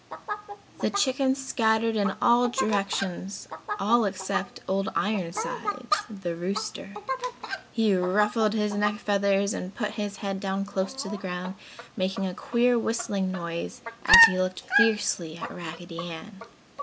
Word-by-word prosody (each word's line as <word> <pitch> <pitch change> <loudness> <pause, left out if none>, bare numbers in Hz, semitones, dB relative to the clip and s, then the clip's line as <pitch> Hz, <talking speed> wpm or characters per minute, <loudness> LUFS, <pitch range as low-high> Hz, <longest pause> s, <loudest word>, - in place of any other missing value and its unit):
The - - +1
chickens 270 -6 +1
scattered 225 -2 +1
in 200 -2 +1
all 240 +1 +5
directions, 200 -5 -2 0.3
all 235 +2 +3
except 195 0 -3
Old 195 +2 0
Ironsides, 215 - -1
the 190 -5 -5
rooster. 200 +3 -4 0.8
He 220 -3 +2
ruffled 210 +4 +2
his 210 -2 0
neck 205 0 +1
feathers 200 0 +1
and 185 -3 -6
put 210 -3 -2
his 205 -1 -4
head 195 -2 -3
down 195 0 -2
close 195 +1 -3
to 265 - -5
the 210 +1 -4
ground, 185 -1 -5 0.4
making 190 +1 -1
a 185 - -3
queer 240 +4 +2
whistling 210 -4 -1
noise 170 -2 -5 0.3
as 460 - +11
he 185 - +1
looked 185 0 -2
fiercely 205 -8 +3
at - - -6
Raggedy 170 0 -8
Ann. 190 +5 -10
200 Hz, 135 wpm, -26 LUFS, 185-220 Hz, 0.8 s, as